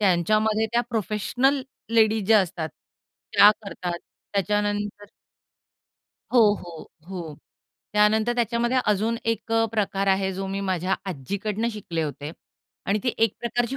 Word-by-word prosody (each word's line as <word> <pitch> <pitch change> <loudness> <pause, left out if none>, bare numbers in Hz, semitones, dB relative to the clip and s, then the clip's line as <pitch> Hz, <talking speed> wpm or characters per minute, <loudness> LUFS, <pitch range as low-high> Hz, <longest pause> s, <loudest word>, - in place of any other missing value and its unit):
त्यांच्यामध्ये 215 +4 +2
त्या 240 - +3
professional 240 +6 +1 0.3
ladies 220 -2 +3
ज्या 220 -2 +6
असतात 165 -3 -3 0.7
त्या 205 - +9
करतात. 180 -3 -4 0.3
त्याच्यानंतर 205 +1 -1 1.3
हो, 245 - +6 0.2
हो, 170 -2 -9 0.3
हो. 170 -5 -6 0.6
त्यानंतर 215 +3 +3
त्याच्यामध्ये 240 +1 +1
अजून 215 +3 +1
एक 230 0 -2
अ, 225 0 +4
प्रकार 200 -2 0
आहे. 190 0 +2
जो 195 +1 -4
मी 195 +1 -3
माझ्या 185 -1 0 0.2
आज्जीकडून 200 - -3
शिकले 170 -6 -3
होते 145 0 -5 0.6
आणि 205 +2 +2
ती 245 - +1
एक 225 -2 +3
प्रकारची 240 +2 -1
210 Hz, 125 wpm, -25 LUFS, 190-225 Hz, 1.3 s, त्या